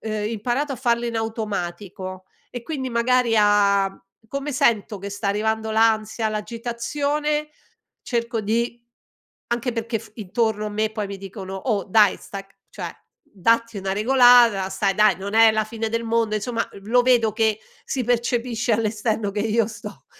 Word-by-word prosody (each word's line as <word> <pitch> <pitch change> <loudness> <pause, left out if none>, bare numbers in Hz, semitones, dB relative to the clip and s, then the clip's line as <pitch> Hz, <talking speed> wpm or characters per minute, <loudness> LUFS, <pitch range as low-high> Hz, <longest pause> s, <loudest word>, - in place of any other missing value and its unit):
uhm, 215 -1 -3
imparato 240 +6 -1
a - - -5
farlo 240 -1 0
in 230 -1 -3
automatico, 190 -4 -4 0.3
e 245 - -6
quindi, 265 -3 -4
magari, 235 0 +2
a 200 -2 +4 0.4
come 275 +3 -4
sento 235 -6 +1
che 200 +1 -6
sta 200 +1 -3
arrivando 220 +2 0
l'ansia, 220 0 +2
l'agitazione, 280 +8 -2 0.5
cerco 235 -1 -2
di 235 +3 -1 0.7
anche 240 +1 -1
perché 230 0 -2
f 220 -1 -14
intorno 215 +1 -1
a 210 - -4
me 215 +1 -1
poi 215 -2 -3
mi 195 0 -7
dicono: 190 0 -8
"Oh, 200 0 -1
dai! 205 0 +4
Stac 195 0 -10
cioè, - - -5 0.3
datti 230 +3 0
una 190 0 -2
regolata, 240 -3 +5
stai 195 0 0
dai, 210 -1 +4
non 200 +2 -5
è 225 0 +7
la 215 0 +1
fine 225 +1 -4
del 230 +1 -1
mondo", 225 -1 +1
insomma, 230 +2 -2
eh, - - -12
v 195 - -16
lo 245 +2 +4
vedo 240 -3 +3
che 220 -1 +1 0.3
si 260 - -2
percepisce 240 0 0
all' 220 +1 +2
esterno 215 -1 -1
che 205 +1 -3
io 220 +1 +1
sto 210 -2 -10
220 Hz, 165 wpm, -23 LUFS, 205-235 Hz, 0.7 s, è